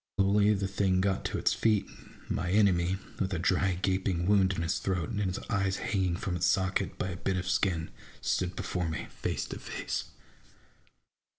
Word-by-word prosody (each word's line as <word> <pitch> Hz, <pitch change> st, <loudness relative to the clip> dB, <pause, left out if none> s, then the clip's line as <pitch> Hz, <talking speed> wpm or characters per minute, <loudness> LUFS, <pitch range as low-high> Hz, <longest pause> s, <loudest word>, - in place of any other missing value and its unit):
Slowly 100 Hz, +2 st, +4 dB
the 100 Hz, 0 st, -1 dB
thing 95 Hz, -1 st, +1 dB
got 95 Hz, 0 st, +1 dB
to -, -, -1 dB
its -, -, +2 dB
feet; 110 Hz, -3 st, +2 dB
and -, -, -14 dB
my 85 Hz, -, -1 dB
enemy, 95 Hz, -2 st, +3 dB, 0.2 s
with 95 Hz, -1 st, 0 dB
a -, -, 0 dB
dry 90 Hz, +2 st, +2 dB
gaping 95 Hz, -2 st, +1 dB
wound 95 Hz, -1 st, +4 dB
in 85 Hz, -, -2 dB
his 80 Hz, +4 st, 0 dB
throat, 95 Hz, 0 st, -1 dB
and 110 Hz, -3 st, -2 dB
his 95 Hz, -2 st, -1 dB
eye 100 Hz, -2 st, +1 dB
hanging 95 Hz, -2 st, 0 dB
from 90 Hz, -1 st, -2 dB
its 85 Hz, 0 st, +1 dB
socket 95 Hz, 0 st, +1 dB
by 95 Hz, -, -2 dB
a 85 Hz, -, -5 dB
bit 95 Hz, +1 st, -1 dB
of 95 Hz, 0 st, -3 dB
skin, 90 Hz, -3 st, 0 dB, 0.3 s
stood 90 Hz, 0 st, -1 dB
before 90 Hz, -3 st, -2 dB
me, 80 Hz, -, -3 dB
face -, -, -2 dB
to -, -, -5 dB
face. -, -, -4 dB
95 Hz, 190 wpm, -30 LUFS, 90-100 Hz, 0.3 s, Slowly